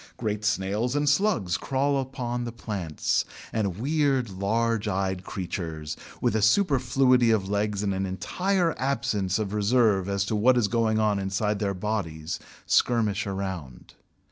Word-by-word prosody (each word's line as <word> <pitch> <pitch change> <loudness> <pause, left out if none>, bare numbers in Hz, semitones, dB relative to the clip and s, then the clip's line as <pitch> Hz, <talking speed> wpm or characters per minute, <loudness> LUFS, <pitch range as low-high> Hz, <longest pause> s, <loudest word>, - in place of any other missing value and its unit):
Great 105 -2 -2
snails 105 +4 0
and 145 0 +1
slugs 145 - +2
crawl 140 +1 0
upon 125 -2 -4
the 120 - -4
plants, 100 -9 -2 0.3
and 100 -5 -1
weird 135 -2 +1
large 110 +3 0
eyed 95 -2 -1
creatures, 80 -6 -5 0.2
with - - +1
a 110 - +2
superfluity 125 - +3
of 105 -4 +2
legs 105 0 0
and 100 -1 0
an 95 0 -1
entire 170 - 0
absence 110 -8 0
of 105 -2 -3
reserve 105 -2 +2
as 100 0 0
to 110 - -1
what 125 +4 +4
is 115 -4 +3
going 110 +1 +1
on 105 -2 +2
inside 100 +2 -1
their 100 -2 -1
bodies, 90 -6 -3 0.3
skirmish 110 -4 +2
around. 95 -9 -5
105 Hz, 145 wpm, -26 LUFS, 95-125 Hz, 0.3 s, what